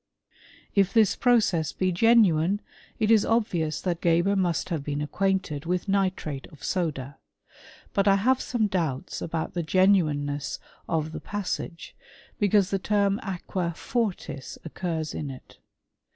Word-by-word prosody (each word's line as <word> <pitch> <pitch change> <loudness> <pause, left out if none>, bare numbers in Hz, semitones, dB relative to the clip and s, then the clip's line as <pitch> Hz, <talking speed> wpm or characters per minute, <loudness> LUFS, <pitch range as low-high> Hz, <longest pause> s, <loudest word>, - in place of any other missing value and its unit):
f - - -36 0.4
If 195 -2 +3
this 220 -4 +4
process 215 -10 +2
be 185 0 0
genuine, 195 -3 +4 0.4
it 215 0 +2
is 220 -2 +6
obvious 180 -9 0
that 175 -2 -2
Gebe*» 170 +4 +3
must 180 -3 0
have 160 -5 -2
been 145 0 -3
acquainted 170 -1 -1
with 180 +3 -1
nitrate 185 -8 -1
of 150 -4 -17
soda; 145 -7 -2 0.7
but 200 0 +2
I 195 - +6
have 250 +6 +2
some 235 -3 0
doubts 165 -10 -2
about 165 -1 -3
the 175 - -1
genuineness 155 -6 +2 0.3
of 160 -1 -1
the - - -6
pas 205 -3 -2
k: - - -5
sage, 170 - -13 0.4
because 205 -1 +3
the 195 - +1
term 200 0 +1
aquafortis 180 - -3
occurs 165 -1 -3
in 150 - -4
it. 130 -1 -12
180 Hz, 145 wpm, -26 LUFS, 160-200 Hz, 0.7 s, is